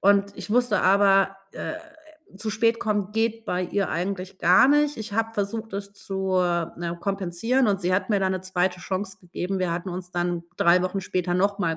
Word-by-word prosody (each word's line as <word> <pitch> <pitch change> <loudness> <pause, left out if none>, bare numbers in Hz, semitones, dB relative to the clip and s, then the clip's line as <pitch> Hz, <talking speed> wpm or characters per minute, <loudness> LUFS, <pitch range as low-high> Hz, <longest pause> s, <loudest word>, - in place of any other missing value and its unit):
und 200 0 +3
ich - - -7
wusste 245 -1 +3
aber: 195 0 +4 0.2
„Äh, - - -5 0.6
zu 215 +2 -3
spät 230 +2 +1
kommen 210 -2 -1
geht 225 0 0
bei 180 -3 -1
ihr 195 0 -1
eigentlich 185 +2 -3
gar 180 +8 +6
nicht.“ 295 0 +3
Ich 215 -2 -6
habe 225 +1 0
versucht, 215 +2 -3
das 200 0 -5
zu, 190 -1 -2
äh, 175 -2 +1
ne, 170 0 -3
kompensieren 200 +6 0
und 195 -1 +1
sie 180 +1 +1
hat 190 - 0
mir 205 - +3
da 190 0 +1
'ne 185 -1 -2
2. 180 -1 -1
Chance 190 +2 -4
gegeben. 180 +1 -4
Wir 180 -2 0
hatten 175 +2 -4
uns 180 0 -6
dann 175 -1 -2
3 175 +1 +5
Wochen 185 +2 -1
später 180 -1 -1
nochmal 185 -3 +1
195 Hz, 200 wpm, -25 LUFS, 180-210 Hz, 0.6 s, gar